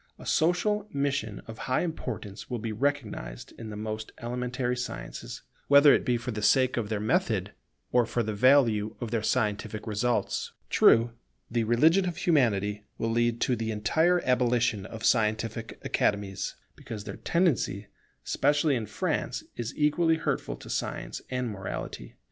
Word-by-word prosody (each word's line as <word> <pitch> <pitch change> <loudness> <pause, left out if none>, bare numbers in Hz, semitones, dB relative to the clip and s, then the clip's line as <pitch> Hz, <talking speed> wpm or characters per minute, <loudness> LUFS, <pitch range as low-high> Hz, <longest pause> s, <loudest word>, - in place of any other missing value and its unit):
A - - -12
social 195 +6 +1
mission 140 -7 -2
of 110 -1 -9
high 130 - +2
importance 115 - -5
will 125 - -2
be 115 0 -4
recognized 110 - -3
in 115 -1 -7
the 105 - -6
most 110 +1 -5
elementary 125 +1 -2
sciences, - - -6 0.2
whether 140 0 +8
it - - +2
be 125 -3 +1
for 120 +1 -4
the 105 -1 -4
sake 130 +4 +4
of 115 -4 -2
their 110 -2 -1
method 110 - 0 0.4
or 120 -2 +3
for 120 - 0
the 110 0 -3
value 115 -3 +4
of 120 -3 -4
their 115 - 0
scientific 105 -2 -1
results. 115 +3 -1 0.2
True, 115 +1 +5 0.4
the 115 -1 +1
religion 160 - +4
of 170 - -7
Humanity 105 - +2
will 115 - -1
lead 120 0 +1
to 125 - +2
the 110 -1 -3
entire 160 +12 +2
abolition 120 -5 +2
of 110 0 -6
scientific 110 0 +1
Academies, 100 -2 -1 0.2
because 105 -2 -7
their - - -7
tendency, 140 - +1 0.4
especially 145 0 +2
in 110 -3 -3
France, - - -2
is 120 -1 -4
equally 160 +2 +3
hurtful 160 - -2
to - - -13
science - - -3
and 125 -1 -1
morality. 80 - -6
115 Hz, 155 wpm, -28 LUFS, 105-135 Hz, 0.4 s, whether